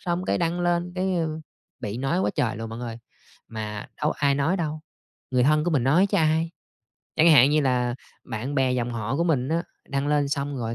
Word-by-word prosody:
xong 175 0 -2
cái - - 0
đăng 170 +1 0
lên 175 0 0
cái, 185 0 0
a, 165 - +1 0.6
bị 105 +1 -4
nói 145 +8 0
quá - - +1
trời 115 -3 0
luôn 115 0 -6
bạn 115 +2 -6
ơi. 115 -1 -5 0.5
Mà 105 -2 -6
đâu - - +3
ai 140 -1 +1
nói 155 +7 +1
đâu, 155 -3 -3 0.5
người 125 -1 +3
thân 150 +2 +3
của 175 - +1
mình 135 -6 +1
nói 170 +9 +4
chứ 200 - 0
ai. 160 +1 +2 0.7
Chẳng 165 +2 +6
hạn 140 -2 +7
như 150 +1 +3
là 125 -3 +1 0.3
bạn 125 +6 -4
bè 130 -2 +2
dòng 120 -1 -1
họ 115 +3 -2
của 170 - +1
mình 135 -6 +1
á 165 +2 0 0.3
đăng 140 +1 -1
lên 145 -1 +2
xong 140 0 -2
rồi 115 -1 -3
145 Hz, 225 wpm, -25 LUFS, 125-165 Hz, 0.7 s, hạn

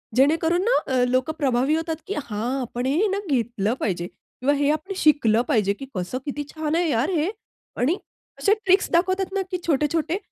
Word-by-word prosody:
जेणेकरून 325 +6 +3
ना, 475 +5 +3 0.2
अ, 250 -1 +3
लोकं 255 +5 +1
प्रभावी 265 +1 +2
होतात, 325 0 -2
की 400 - -2
"हा 210 -1 -5 0.2
आपण 245 +1 -4
हे 325 +11 +2
ना, 395 +1 -1
घेतलं 235 -4 0
पाहिजे" 175 -4 -1
किंवा 275 +8 -3
"हे 285 0 +1
आपण 380 +6 -3
शिकलं 240 - +4
पाहिजे." 210 -8 +2
की 270 - -6
कसं 185 +7 -3
किती 290 0 -3
छान 315 0 -1
आहे 340 -1 +1
यार 265 +5 +1
हे 335 0 +1 0.5
आणि 285 +9 +2 0.4
असे 415 - +4
ट्रिक्स 380 +1 +4
दाखवतात 375 +2 +1
ना, 395 - +1
की 365 - 0
छोटे-छोटे 310 +3 +1
295 Hz, 185 wpm, -24 LUFS, 245-340 Hz, 0.5 s, शिकलं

